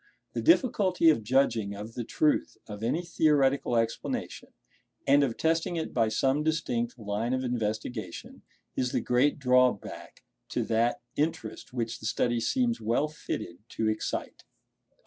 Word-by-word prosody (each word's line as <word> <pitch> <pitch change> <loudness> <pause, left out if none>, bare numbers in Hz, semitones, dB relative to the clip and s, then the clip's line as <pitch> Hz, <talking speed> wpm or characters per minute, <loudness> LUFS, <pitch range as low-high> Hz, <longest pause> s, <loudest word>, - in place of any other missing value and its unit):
The - - -2
difficulty 200 - +4
of 115 -8 -1
judging 110 -4 +1
of 105 +3 -8
the 120 - -4
truth 150 +6 +1
of 105 -1 -8
any 140 +10 0
theoretical 140 -6 +2
explanation, 115 0 -2 0.6
and 140 +1 +5
of 125 -5 -1
testing 165 +2 +1
it 160 - -3
by 115 -2 +3
some 135 +6 +1
distinct 130 -7 -1
line 110 +3 -2
of 130 - -2
investigation, 110 -4 -4 0.3
is 125 -1 -1
the - - +2
great 125 +4 +2
drawback 125 -2 +1 0.3
to - - -1
that 115 +2 +1
interest 150 -8 -3
which 115 -2 -3
the 110 - -4
study 120 +2 +1
seems 240 - 0
well 120 +7 +1
fitted 85 - -6
to 110 - -1
excite. 110 - -3
125 Hz, 145 wpm, -28 LUFS, 115-150 Hz, 0.6 s, and